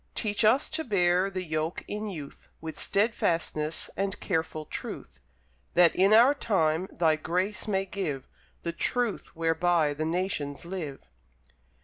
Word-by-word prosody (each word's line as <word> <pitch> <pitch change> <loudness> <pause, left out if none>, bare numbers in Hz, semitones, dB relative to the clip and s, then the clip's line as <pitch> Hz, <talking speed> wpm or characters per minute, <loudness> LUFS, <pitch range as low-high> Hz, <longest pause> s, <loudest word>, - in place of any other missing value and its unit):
Teach 215 0 0
us 230 +7 +4
to 320 - -2
bear 185 - +2
the 185 -1 -4
yoke 155 0 -2
in 210 +1 -4
youth 150 -7 -9
With 160 0 -6
steadfastness 165 -7 0
and 195 +1 -2
careful 160 -3 -2
truth; - - -7 0.6
That, 175 -1 +6
in 195 +2 +4
our 235 +6 +7
time, 185 - +1
Thy 160 -2 +2
Grace 185 +7 -1
may 195 -2 +1
give 170 -9 -4 0.4
The 170 - -2
Truth 240 +4 -1
whereby 165 -1 +2
the 155 +2 -3
Nations 165 -4 -2
live. 170 -7 -5
175 Hz, 135 wpm, -28 LUFS, 160-200 Hz, 0.6 s, our